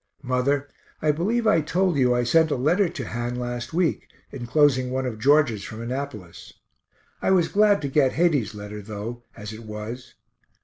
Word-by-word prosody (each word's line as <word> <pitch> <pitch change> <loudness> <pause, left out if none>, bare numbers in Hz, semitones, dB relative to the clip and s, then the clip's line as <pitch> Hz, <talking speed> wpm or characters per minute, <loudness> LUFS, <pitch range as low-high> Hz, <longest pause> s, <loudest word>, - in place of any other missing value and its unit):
Mother, 135 +2 0 0.3
I 155 - +2
believe 215 +10 0
I 210 -7 +4
told 180 +3 +1
you 125 -3 +3
I 120 - +1
sent 160 +6 +3
a - - 0
letter 170 +9 +2
to 130 -8 -6
Han 120 +1 -3
last 120 0 -4
week, 170 0 0 0.2
enclosing 130 0 +2
one 130 +1 -2
of 115 -4 -4
George's 135 -5 +3
from 110 - -8
Annapolis. 115 -7 -6 0.7
I - - +1
was 180 -3 +3
glad 205 -5 +3
to - - 0
get 135 -1 +2
Heyde's 145 - +1
letter, 105 0 -7
though, 110 +3 -6 0.2
as 105 +1 -7
it 110 - -9
was. 110 +3 -8
130 Hz, 175 wpm, -24 LUFS, 115-155 Hz, 0.7 s, I